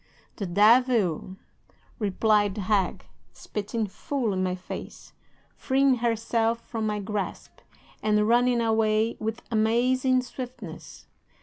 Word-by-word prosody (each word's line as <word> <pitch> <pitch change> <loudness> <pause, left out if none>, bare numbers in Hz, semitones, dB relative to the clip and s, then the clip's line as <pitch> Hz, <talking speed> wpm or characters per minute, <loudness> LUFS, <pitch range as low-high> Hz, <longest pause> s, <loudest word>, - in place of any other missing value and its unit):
"'"The 200 - -3
devil!" 210 -2 +3 0.6
replied 205 -1 +2
the 210 - -3
hag, 195 -1 0 0.3
spitting 215 +2 -4
full 230 +2 -3
in 185 - -1
my 185 -1 0
face, 185 - -9 0.4
freeing 270 -1 +2
herself 230 0 0
from 225 -2 -4
my 210 -1 -1
grasp, 205 0 -5 0.4
and 210 0 +2
running 240 +1 +3
away 220 0 +2
with 220 +1 -4
amazing 250 +4 +2
swiftness. 245 -9 -9
220 Hz, 110 wpm, -26 LUFS, 205-240 Hz, 0.6 s, devil